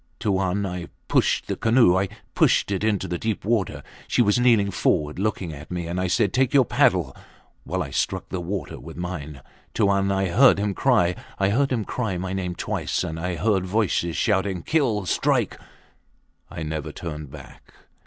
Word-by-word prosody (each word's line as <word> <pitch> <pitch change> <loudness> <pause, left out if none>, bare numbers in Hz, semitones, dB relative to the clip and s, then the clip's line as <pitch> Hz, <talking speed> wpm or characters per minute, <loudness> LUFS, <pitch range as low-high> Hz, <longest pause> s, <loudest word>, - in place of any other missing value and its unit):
Tuan, 95 0 0
I 90 -2 -5 0.2
pushed - - +2
the - - -3
canoe! 115 -5 +4
I 95 +1 +1 0.2
pushed - - +3
it 100 0 -1
into 105 -3 0
deep 95 +4 -3
water. 110 -4 0 0.2
She 120 - +3
was 105 +2 +2
kneeling 115 -5 +4
forward 75 -3 0
looking 95 -5 -2
at 75 +1 -10
me, 90 -1 -3
and 85 +2 -2
I 95 - 0
said, 95 +2 +1
Take 130 +1 +2
your 135 -3 +6
paddle, - - +2 0.5
while - - -2
I - - -8
struck - - -2
the 95 - -3
water 95 +2 -5
with 80 +6 -10
mine. 75 -6 -6 0.3
Tuan, 100 -2 +2
I 95 -1 0
heard 125 +7 +6
him 100 0 -1
cry. 105 -8 +3 0.2
I 95 0 +2
heard 135 +6 +1
him 115 -5 0
cry 110 -7 -2
my 95 +1 -4
name 90 -2 -3
twice; - - -2
and 80 +1 -4
I 90 +1 -2
heard 95 +1 +1
voices 90 -4 0
shouting, 95 -4 0
Kill! 125 - +1
Strike! - - 0 0.9
I 80 - -6
never 75 -1 -4
turned 75 -4 -7
back. 70 -1 -13
95 Hz, 180 wpm, -24 LUFS, 85-105 Hz, 0.9 s, your